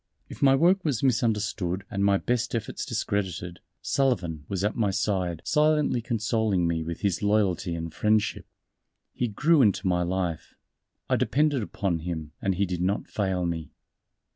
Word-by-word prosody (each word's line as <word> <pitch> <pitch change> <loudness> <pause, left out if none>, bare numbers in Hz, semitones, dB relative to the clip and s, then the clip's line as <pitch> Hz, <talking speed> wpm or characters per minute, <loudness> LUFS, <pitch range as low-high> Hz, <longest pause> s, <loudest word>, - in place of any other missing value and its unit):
If - - -10
my 135 -1 +6
work 180 +6 +3
was 140 -7 -1
misunderstood 105 -6 0
and 100 0 -1
my 100 0 +4
best 120 +2 -1
efforts 110 -2 -4
discredited, 90 -3 -2 0.2
Sullivan 90 - 0
was 95 -1 -2
at 105 - 0
my 110 -4 +1
side 95 -4 -1
silently 150 -4 +2
consoling 110 -5 0
me 85 -1 0
with 85 +1 -5
his 100 -5 0
loyalty 100 -5 +1
and 85 -1 -5
friendship. 105 +2 +1 0.7
He 125 - -1
grew 150 +9 +3
into 105 -4 +2
my 90 -1 +2
life. 90 -2 -2 0.5
I - - +2
depended 145 -2 +2
upon 95 -4 -2
him 80 -2 -5
and 95 -1 0
he 100 +3 +1
did 90 -2 -3
not 95 +3 -1
fail 95 -3 -1
me. 80 -3 -4
100 Hz, 160 wpm, -26 LUFS, 90-115 Hz, 0.7 s, my